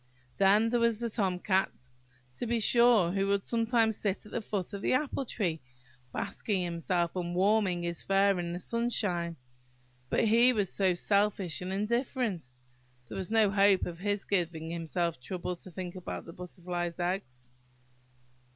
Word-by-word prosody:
There 215 +5 +4
was 230 -2 +2
the 235 -1 -3
Tom 195 -5 0
Cat, 190 +1 +1 0.7
to 240 - -3
be 235 0 +1
sure, 230 -5 +5
who 195 +1 0
would 200 0 +1
sometimes 230 -1 +2
sit 200 -1 -2
at 210 - -13
the 235 - -2
foot 205 -2 -4
of 200 - -5
the - - +1
apple 275 0 0
tree, 170 -10 -2 0.5
basking 195 - -2
himself 170 0 -1
and 175 -1 -3
warming 190 -2 +2
his 170 -1 -3
fur 195 -1 +3
in 170 -1 -3
the 175 - -3
sunshine; 185 -6 -1 0.7
but - - +2
he 235 +3 +5
was 205 -5 -1
so 190 -3 +2
selfish 200 -3 +1
and 180 +1 -4
indifferent!–there 220 - -1 0.7
was 190 -1 -4
no 220 -2 +4
hope 200 -1 +4
of 170 -1 -6
his 205 +1 -1
giving 165 -4 -1
himself 170 0 -2
the - - -35
trouble 180 +5 -4
to 185 - -10
think 180 0 -6
about 180 - -6
butterflies' 175 -1 -5
eggs. 130 -9 -3
195 Hz, 160 wpm, -30 LUFS, 175-215 Hz, 0.7 s, sure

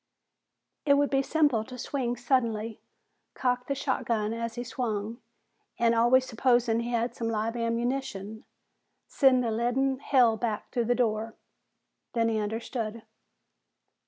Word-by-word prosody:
It 280 -1 +5
would 285 0 +2
be 270 -1 +3
simple 290 -6 +2
to 250 +2 -10
swing 245 -1 -2
suddenly, 230 -3 0 0.5
cock 250 -1 0
the 275 - -1
shotgun 235 -5 -1
as 230 0 -4
he 240 - -4
swung 225 -2 -3 0.6
and, 235 0 +3
always 240 +3 +4
supposing 240 -1 +2
he 235 +1 -3
had 235 0 0
some 230 -1 -3
live 225 +1 -1
ammunition, 230 -3 -2 0.6
send 255 -3 +4
a 230 - 0
leaden 255 +4 0
hail 245 -6 +3
back 220 -2 -3
through 240 -2 0
the 245 +2 +2
door. 225 -2 -1 0.8
Then 230 -1 +2
he 220 -1 0
understood. 220 +1 -4
235 Hz, 135 wpm, -28 LUFS, 225-255 Hz, 0.8 s, It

